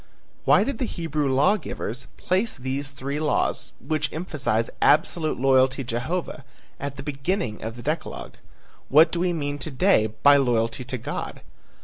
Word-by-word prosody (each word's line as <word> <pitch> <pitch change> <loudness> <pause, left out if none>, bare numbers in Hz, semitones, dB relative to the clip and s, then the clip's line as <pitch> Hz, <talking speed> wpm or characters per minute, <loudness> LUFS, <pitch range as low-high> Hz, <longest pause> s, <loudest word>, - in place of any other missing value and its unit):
Why - - +6
did 275 -5 -3
the 255 - 0
Hebrew 155 - -2
law 145 +11 +4
givers 125 - -5
place 190 +5 0
these 135 +2 -3
three 140 +1 -4
laws, 155 -1 0
which 155 -3 -2
emphasize 140 -9 -1
absolute 155 -1 +2
loyalty 130 0 +3
to 125 - -11
Jehovah, 155 +5 -3 0.4
at 140 0 -4
the 135 - -7
beginning 140 - -2
of 115 +1 -5
the 120 - -10
decalogue? 155 +3 -4 0.6
What 155 +4 +6
do 170 - -2
we 180 0 +1
mean 145 -3 -3
to 155 - -4
day 140 - +3
by 140 +6 +5
loyalty 120 -2 +1
to 130 0 -4
God? 115 - -5
140 Hz, 160 wpm, -24 LUFS, 130-160 Hz, 0.6 s, Why